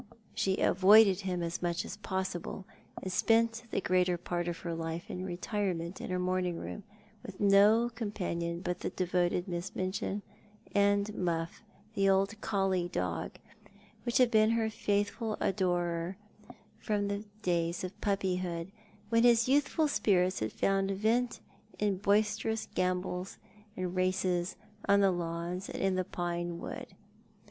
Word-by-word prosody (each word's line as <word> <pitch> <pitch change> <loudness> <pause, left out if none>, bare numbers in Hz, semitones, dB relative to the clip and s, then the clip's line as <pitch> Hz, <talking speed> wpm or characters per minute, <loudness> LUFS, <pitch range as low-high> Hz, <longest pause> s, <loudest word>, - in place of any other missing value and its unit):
She 190 0 0
avoided 195 +1 +6
him 180 -3 -2
as 170 0 -3
much 175 -1 -1
as 200 - -7
possible, 190 -2 -4 0.4
and 185 - -3
spent 225 +4 +2
the - - 0
greater 180 -1 +2
part 175 0 -3
of 170 -1 -2
her 170 - -3
life 165 +1 -4
in - - -5
the 185 - -4
retirement 180 -1 -3
of - - -6
her 185 - 0
morning 180 -1 0
room, 210 - -6 0.4
with 190 - -9
DO 210 +4 +5
companion 175 -7 -3
but 180 -1 -2
the - - -2
devoted 180 0 0
Miss 175 0 -4
Minchin, 190 +2 -2 0.5
and 200 0 +3
Muflf, 170 -3 -2 0.3
the 195 -2 +3
old 195 +3 +1
collie 195 -4 +1
dog, 90 - -2 0.7
which 240 -1 +1
had 250 -2 +5
been 215 0 +5
her 225 -1 +1
faithful 205 +1 -1
adorer 175 -2 0 0.6
from 205 -2 -1
the 200 +1 -2 0.2
days 170 -1 0
of 185 +1 -7
piippyhood, 185 -3 -1 0.4
when 230 0 +4
his 235 -1 +5
youthful 290 +3 +3
spirits 185 -9 +2
had 110 0 -2
found 195 0 +1
vent 225 +5 0 0.4
in 205 -2 +1
boisterous 210 +2 +1
gambols 180 0 -1 0.4
and 185 -1 -3
races 185 -1 0 0.3
on 200 0 +6
the 195 -1 +5
lawns 175 +2 -3
and - - -4
in 195 -1 +2
the 185 0 0
pine 175 -1 -3
wood. - - -6
185 Hz, 145 wpm, -31 LUFS, 175-205 Hz, 0.7 s, avoided